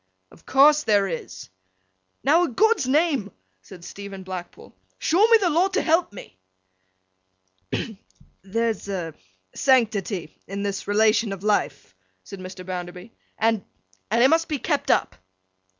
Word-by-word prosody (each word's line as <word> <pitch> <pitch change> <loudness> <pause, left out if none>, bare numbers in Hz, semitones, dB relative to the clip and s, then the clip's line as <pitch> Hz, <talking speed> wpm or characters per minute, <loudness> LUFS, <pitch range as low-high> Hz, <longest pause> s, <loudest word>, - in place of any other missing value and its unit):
'Of - - -20
course 295 +3 +5
there 205 -7 +2
is.' 125 - -7 0.7
'Now, 310 +6 +4
a' - - -2
God's 420 - +2
name,' 280 - +1 0.3
said 170 - -13
Stephen 200 -1 -9
Blackpool, 185 -2 -9 0.2
'show 380 +7 +3
me 460 0 +7
the 375 -5 0
law 340 +5 +3
to 390 +2 -1
help 330 - +2
me!' 135 - -12 1.3
'Hem! 220 -4 -4 0.4
There's 225 +2 -2
a 175 -5 -4 0.4
sanctity 210 - +1
in 200 +1 -5
this 200 -1 -4
relation 215 +1 +2
of 195 0 -9
life,' 140 - -1 0.3
said 195 - -10
Mr. 185 0 -9
Bounderby, 180 +2 -7 0.3
'and—and—it 215 - 0
must 325 +3 +2
be 300 - -2
kept - - -2
up. - - +1
210 Hz, 135 wpm, -23 LUFS, 185-280 Hz, 1.3 s, me